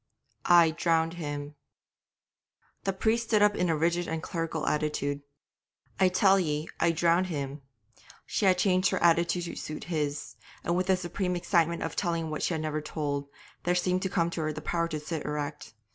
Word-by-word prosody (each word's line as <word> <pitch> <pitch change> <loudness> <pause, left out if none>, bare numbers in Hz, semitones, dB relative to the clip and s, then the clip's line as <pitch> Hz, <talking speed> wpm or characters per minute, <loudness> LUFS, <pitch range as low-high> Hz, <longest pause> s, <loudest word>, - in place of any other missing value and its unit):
'I 170 -2 +6
drowned 165 0 +1
him.' 145 -3 -5 1.3
The 195 - +2
priest 225 +4 +1
stood 215 -2 +4
up 210 0 +4
in 180 - +1
a 160 - +2
rigid 170 +2 +1
and 160 -1 -3
clerical 165 -3 -3
attitude. 150 -2 -1 0.8
'I 190 -1 +5
tell 195 +1 +4
ye 150 -3 -1
I 170 - +3
drowned 170 +2 +2
him.' 140 -4 -4 0.6
She 205 - 0
had 185 -1 +5
changed 185 0 +3
her - - -1
attitude 170 +1 +3
to 170 - -5
suit 155 - -6
his; 150 -1 -2 0.3
and 170 - 0
with 185 +1 0
the 190 -1 +4
supreme 180 +1 -2
excitement 170 -2 +1
of 165 - -4
telling 165 -3 -1
what 155 - -3
she 175 - 0
had 155 - -2
never 155 0 -2
told, 145 -2 -3 0.3
there 175 +1 +1
seemed 180 +1 +1
to 190 - -1
come 170 -2 +1
to 170 - -3
her 155 0 -1
the 155 - -6
power 170 +2 -1
to 155 -2 -4
sit 155 0 -4
erect. 145 -7 -5
170 Hz, 190 wpm, -29 LUFS, 155-180 Hz, 1.3 s, I